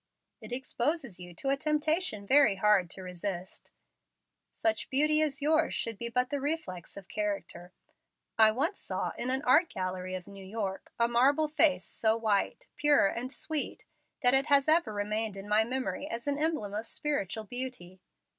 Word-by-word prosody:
"It - - -9
exposes 260 - -2
you 175 -1 -11
to 270 - -3
a 275 - +3
temptation 305 - 0
very 265 -3 +5
hard 195 -3 +2
to 190 - -8
resist. 180 0 -6 0.8
Such 220 -1 0
beauty 305 +3 +4
as 285 -2 -1
yours 315 +2 +2
should 225 -3 -3
be 235 - -3
but 250 +1 0
the 285 -1 -2
reflex 275 - -4
of 195 -2 -10
character. 200 -4 -4 0.6
I 220 -1 +7
once 290 - -1
saw, - - -3
in 250 - -3
an 265 +2 +2
art 305 +7 +4
gallery 185 0 -4
of 180 -1 -7
New 195 -1 -12
York, 195 -1 -5
a 235 - +3
marble 275 +6 +3
face 305 -1 +3
so 220 0 0
white, 215 -3 -1
pure, 295 -6 +4
and 250 +5 -5
sweet, 310 0 -2 0.4
that 245 0 +8
it 270 +2 +5
has 280 -1 +4
ever 320 -5 +3
remained 210 0 -3
in 195 +1 -9
my 210 +1 +3
memory 260 +4 -3
as 235 -4 -6
an 285 0 -1
emblem 305 -10 -1
of 215 +2 -4
spiritual 225 -8 -2
beauty. 245 -6 -5
235 Hz, 175 wpm, -29 LUFS, 200-290 Hz, 0.8 s, that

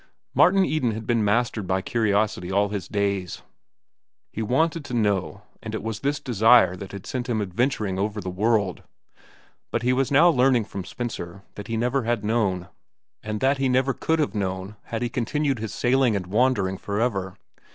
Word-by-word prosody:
Martin 190 +2 +5
Eden 130 -7 0
had 110 +1 -6
been 115 -1 +1
mastered 110 -1 0
by 95 +1 +1
curiosity 100 -3 0
all 100 +1 +2
his 100 -2 -4
days. 100 -3 -2 0.9
He 110 - -3
wanted 160 +8 +1
to 125 - -4
know, 100 -8 0 0.2
and - - -5
it - - -5
was 110 -1 -4
this 140 +2 -1
desire 115 -5 +4
that 95 +1 -8
had 100 -2 -8
sent 125 -1 -4
him 115 -2 0
adventuring 105 -1 -1
over 105 +1 -1
the 95 -2 -4
world. 100 -1 +1 0.9
But 115 - -2
he 125 +1 +3
was 135 0 +1
now 150 +5 +6
learning 125 -5 +3
from 95 -2 -7
Spencer 100 -6 -6
that 105 - -8
he 115 - -2
never 125 +4 +1
had 115 -3 -1
known, 100 -5 0 0.5
and 105 -1 -4
that 135 +1 +2
he 135 -1 +1
never 130 +1 +2
could 160 +5 0
have 150 -10 0
known 95 0 -3
had 115 +1 -3
he - - +1
continued 135 +3 -1
his 110 -1 -4
sailing 120 +2 +2
and 95 -2 -2
wandering 100 -2 +1
forever. 100 -3 -2
110 Hz, 185 wpm, -24 LUFS, 100-125 Hz, 0.9 s, now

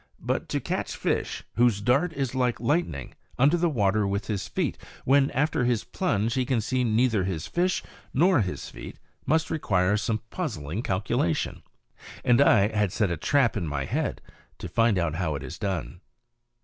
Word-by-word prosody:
But - - -2
to - - 0
catch - - -3
a - - -11
fish - - -1
whose 120 -4 +4
dart 135 - +2
is 135 -5 -2
like 125 -2 0
lightning 120 - -1 0.2
under 140 +6 +4
the 175 0 +2
water 105 -6 +1
with 100 +1 -2
his 105 -3 -3
feet, - - -2 0.3
when, 135 +1 +4
after 145 -2 0
his 120 -3 +1
plunge, 115 - -1
he 130 - +1
can 125 -2 0
see 125 +4 0
neither 115 -3 +2
his 90 -4 -3
fish 180 +1 0 0.3
nor 170 -1 +4
his 95 -2 -4
feet, - - -9 0.3
must 160 +1 +2
require 100 - +1
some 110 +1 -2
puzzling 105 - -3
calculation. 95 -3 -1 0.6
And 125 +1 +5
I 105 -7 +5
had 105 -3 +2
set 105 -3 0
a - - 0
trap 135 - +2
in 85 - -2
my 75 -2 -2
head - - -2 0.4
to - - -6
find 115 -3 +2
out 85 -3 0
how 85 -5 -1
it - - -5
is - - -8
done. 90 -6 -3
115 Hz, 180 wpm, -26 LUFS, 95-135 Hz, 0.6 s, And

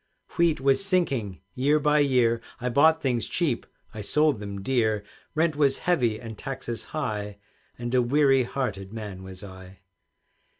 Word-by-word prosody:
Wheat 170 -3 +3
was 135 +6 +2
sinking 140 - +1
year 145 +4 +2
by 150 0 +3
year, 125 -5 +3 0.2
I 125 +1 -2
bought 160 +5 +4
things 120 -5 0
cheap, - - -1 0.3
I 105 - -6
sold 150 +4 +2
them 100 -1 -6
dear; 110 -4 +1 0.3
Rent 160 0 +2
was 140 -2 +3
heavy 120 -11 +2
and 115 -2 -8
taxes 130 -4 -5
high, 105 -9 -4 0.4
And 120 +1 -4
a 125 - +4
weary 135 +1 +4
hearted 110 -7 -3
man 105 -4 -7
was 95 +1 -10
I. 95 -1 -12
125 Hz, 155 wpm, -26 LUFS, 105-145 Hz, 0.4 s, bought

